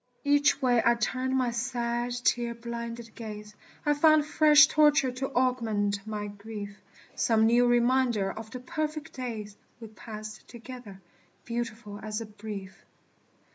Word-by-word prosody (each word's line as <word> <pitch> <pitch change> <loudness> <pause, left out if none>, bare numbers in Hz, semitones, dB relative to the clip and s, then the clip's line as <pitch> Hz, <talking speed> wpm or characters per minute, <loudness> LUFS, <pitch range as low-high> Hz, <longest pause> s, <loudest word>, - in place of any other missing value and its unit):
Each 290 0 +3
way 245 -2 +4
I 235 0 +4
turned 255 +3 -1
my 250 -2 +1
sad, 240 0 -2
tear 235 -1 +1
blinded 235 -1 -6
gaze, 210 -2 -8 0.3
I 295 - +4
found 310 0 +5
fresh 300 -1 +7
torture 295 -3 +4
to 260 +2 -4
augment 220 -5 0
my 210 -1 -3
grief; 205 0 -8 0.3
Some 220 -1 +2
new 240 +2 +4
reminder 240 -4 +2
of 220 0 -8
the 255 - -7
perfect 305 +2 -4
days 220 -5 -6 0.2
We 225 -2 -9
passed 215 0 -9
together, 235 -4 -10 0.5
beautiful 230 -3 -5
as 215 0 -4
brief. 210 -3 -9
235 Hz, 135 wpm, -28 LUFS, 215-255 Hz, 0.5 s, fresh